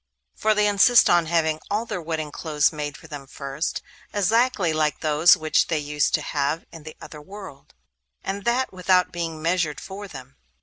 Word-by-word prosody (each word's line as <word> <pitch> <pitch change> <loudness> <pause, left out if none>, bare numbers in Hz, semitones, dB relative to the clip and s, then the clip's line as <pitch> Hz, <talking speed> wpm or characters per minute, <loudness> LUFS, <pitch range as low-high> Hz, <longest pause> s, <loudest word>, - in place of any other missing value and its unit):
For 215 - +1
they 210 0 +3
insist 210 +4 +5
on 170 -2 +3
having 160 -2 +1
all 210 +3 -1
their 185 - -4
wedding 155 -2 -4
clothes 150 0 0
made 145 -2 -5
for - - -16
them 145 -3 -9
first, 140 +4 -4 0.3
exactly 210 -3 +1
like 155 -1 0
those 155 +3 +5
which 155 -1 +1
they 160 - 0
used 150 0 0
to - - -3
have 145 +2 -2
in 165 - -11
the 155 +1 -11
other 150 - -11
world, 190 - -12 0.5
and 195 +1 -4
that 240 +2 0
without 180 0 +2
being 165 -3 -5
measured 165 -4 0
for 200 +1 -8
them. 135 -6 -12
165 Hz, 180 wpm, -23 LUFS, 150-195 Hz, 0.5 s, insist